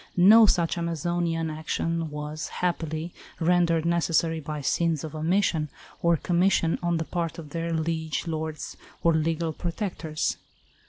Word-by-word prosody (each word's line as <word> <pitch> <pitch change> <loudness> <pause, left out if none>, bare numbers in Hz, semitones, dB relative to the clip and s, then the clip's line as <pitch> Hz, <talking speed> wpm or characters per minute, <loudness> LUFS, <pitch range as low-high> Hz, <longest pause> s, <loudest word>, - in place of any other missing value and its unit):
No 215 +5 +8
such 170 -2 +2
Amazonian 170 0 -1
action 165 +1 -2
was, 150 +1 -5
happily, 165 -2 -2 0.3
rendered 170 -1 +3
necessary 165 -1 +1
by 150 0 -5
sins 165 +2 +1
of 160 - -6
omission 160 -1 +1 0.3
or 170 -1 +3
commission 175 0 +2
on 175 -1 +1
the 160 - -2
part 170 -1 -3
of 155 -3 -9
their 170 +1 -2
liege 160 -1 -1
lords 160 -2 -4 0.3
or 170 - +4
legal 160 +1 0
protectors. 170 -3 -3
165 Hz, 130 wpm, -26 LUFS, 155-170 Hz, 0.3 s, No